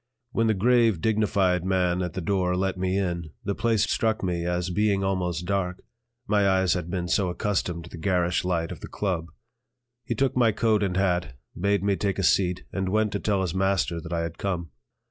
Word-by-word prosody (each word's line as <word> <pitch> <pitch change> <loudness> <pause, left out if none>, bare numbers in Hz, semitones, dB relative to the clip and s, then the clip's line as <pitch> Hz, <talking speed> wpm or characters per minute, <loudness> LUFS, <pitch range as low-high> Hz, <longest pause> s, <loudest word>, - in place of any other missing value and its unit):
When 115 -1 +1
the 110 - +2
grave, 115 -2 +3
dignified 100 -3 +1
man 90 -1 +1
at 90 -1 -3
the 95 - -3
door 90 0 0
let 95 0 0
me 95 +1 -1
in, 85 -4 -2
the 100 -1 -1
place 110 -1 +1
struck 110 -2 0
me 85 -2 -1
as 90 0 -1
being 100 +1 +1
almost 90 -3 -1
dark, 95 -1 -2 0.4
my 100 -2 +3
eyes 95 -2 +3
had 90 -2 -3
been 90 -1 -2
so 95 +1 +1
accustomed 90 -2 -2
to 85 - -11
the 85 - -8
garish 90 -1 +1
light 85 -2 -1
of - - -7
the - - -8
"Club." 90 -5 -2 0.8
He 120 - -3
took 135 +3 +1
my 120 -3 +4
coat 110 0 +2
and 95 -2 0
hat, 90 -8 0 0.2
bade 100 +2 +1
me 100 -1 +2
take 100 -2 -1
a 95 - -1
seat, 90 +1 +2
and 95 -1 -1
went 110 +1 +1
to 100 - -2
tell 100 -2 0
his 90 -4 -1
master 95 -3 0
that 80 - -9
I 85 -1 0
had 85 -1 -5
come. 85 -5 -3
95 Hz, 210 wpm, -26 LUFS, 90-100 Hz, 0.8 s, my